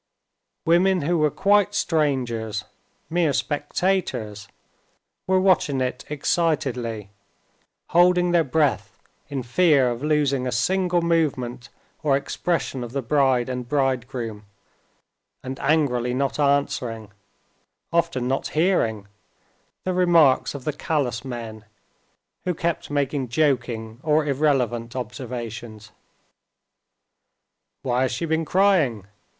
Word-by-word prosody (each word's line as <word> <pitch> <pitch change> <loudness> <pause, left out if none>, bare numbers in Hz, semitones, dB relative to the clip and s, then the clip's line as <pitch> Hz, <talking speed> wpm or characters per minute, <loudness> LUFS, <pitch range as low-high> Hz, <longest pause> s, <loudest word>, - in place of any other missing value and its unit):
Women 180 +1 +3
who 170 +3 +1
were 155 0 +3
quite 205 +5 +2
strangers, 125 - 0 0.4
mere 165 -3 +1
spectators, 145 - -1 0.8
were 190 0 +3
watching 180 -7 +2
it 125 -1 -3
excitedly, 130 - -1 0.8
holding 175 +1 +4
their 170 -1 +4
breath, 145 - 0 0.3
in 135 -3 -3
fear 135 -1 +3
of 120 +1 -5
losing 145 -4 +1
a - - -1
single 175 +7 +1
movement 135 -7 -1 0.3
or 140 -3 +3
expression 135 -3 -2
of 120 0 -8
the 140 -1 -2
bride 130 -2 +2
and 125 -2 -5
bridegroom, 125 -6 -2 1.0
and 130 +1 -6
angrily 135 -5 +1
not 135 +1 -1
answering, 125 -7 0 0.8
often 170 -7 +1
not 135 +1 -1
hearing, 135 - +1 0.8
the 185 - -1
remarks 170 -8 +4
of 140 - -7
the 150 - -2
callous 140 -5 -2
men, 115 -4 -7 0.8
who 180 -2 -1
kept 170 0 -2
making 140 -2 -1
joking 120 -5 -1
or 150 0 +2
irrelevant 130 -5 0
observations. 115 -3 -6 1.9
"Why 125 -1 0
has 130 - +1
she 170 - -2
been 160 0 0
crying? 165 - +2
135 Hz, 110 wpm, -23 LUFS, 120-160 Hz, 1.9 s, holding